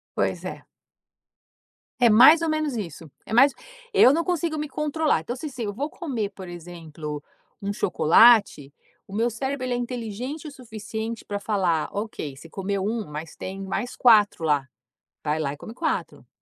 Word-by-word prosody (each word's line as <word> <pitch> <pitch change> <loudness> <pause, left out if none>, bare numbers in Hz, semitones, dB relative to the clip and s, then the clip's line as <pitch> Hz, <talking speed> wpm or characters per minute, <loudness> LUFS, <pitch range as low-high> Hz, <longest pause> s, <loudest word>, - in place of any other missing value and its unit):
Pois - - -1
é. - - -7 1.3
É 240 - +6
mais 260 +10 +8
ou 330 - 0
menos 310 -3 -1
isso, 165 -7 -6 0.2
é 220 - -7
mais 270 +3 +6 0.4
eu 265 -9 +7
não 335 - +1
consigo 335 -3 -1
me 300 0 -3
controlar, 300 - 0
então 240 - -4
se 265 - -8
assim, 260 -5 -5
eu 205 - -3
vou 280 +8 -3
comer 255 - -3
por 190 -2 -10
exemplo, 160 -4 -8 0.4
um 200 0 -2
chocolate, 200 - +4 0.3
o 195 - -9
meu 230 +3 +2
cérebro 265 +3 -3
ele 250 - -1
é - - -1
inteligente 245 +4 -5
o 305 - -6
suficiente 220 -3 -6
pra 205 0 -4
falar: 185 -7 0
"Ok, 200 -9 -5
você 160 +4 -13
comeu 195 +1 -3
1 220 0 -2
mas 150 +2 -7
tem 190 +1 -6
mais 240 +6 -3
4 210 -7 +5
lá. 145 -4 +1 0.6
Vai 150 +1 0
lá 140 -3 -1
e - - -10
come 220 - -9
4". 315 +6 -3
220 Hz, 175 wpm, -25 LUFS, 175-260 Hz, 1.3 s, mais